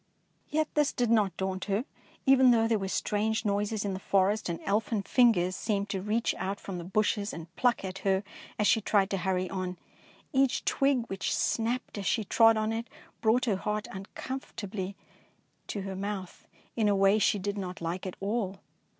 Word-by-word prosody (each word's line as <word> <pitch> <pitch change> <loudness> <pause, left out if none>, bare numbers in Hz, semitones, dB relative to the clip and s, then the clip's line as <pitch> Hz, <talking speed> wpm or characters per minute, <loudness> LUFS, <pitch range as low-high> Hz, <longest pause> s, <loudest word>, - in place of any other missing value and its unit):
Yet 310 0 +1
this 295 -2 +2
did 240 -2 +1
not 205 -6 +3
daunt 190 0 -2
her, 205 +5 0 0.4
even 265 -2 +6
though 225 -2 +4
there 225 -2 +2
were 195 - -3
strange 220 +3 0
noises 205 +1 0
in 200 - -1
the 190 - -4
forest 195 +1 +1
and 170 - -3
elfin 210 +1 0
fingers 190 -7 +3
seemed 200 -1 -1
to 195 -2 -2
reach 215 +4 0
out 195 +2 -2
from 185 -3 -6
the - - -6
bushes 205 +2 0
and 165 +1 -9
pluck 245 -5 +2
at 190 0 -5
her 195 0 +1 0.3
as 210 - +1
she 225 - +4
tried 200 -1 +2
to 195 - +1
hurry 185 0 0
on. 185 -1 -3 0.6
Each 270 -1 +2
twig 275 -4 +2
which 195 -3 -2
snapped 235 -1 -1
as 195 - -3
she 225 - +1
trod 225 +2 +5
on 215 +1 0
it 230 +1 -3 0.3
brought 240 +3 +3
her 210 -6 +1
heart 210 +2 -2
uncomfortably 200 -1 -6 0.7
to 205 - -3
her 195 0 -5
mouth, 195 -1 -5 0.3
in 220 -3 +2
a 205 - +3
way 195 +2 +4
she 210 - +3
did 200 +1 -3
not 185 -1 -5
like 170 +3 -3
at 185 - -6
all. 200 -1 -2
205 Hz, 190 wpm, -29 LUFS, 190-225 Hz, 0.7 s, even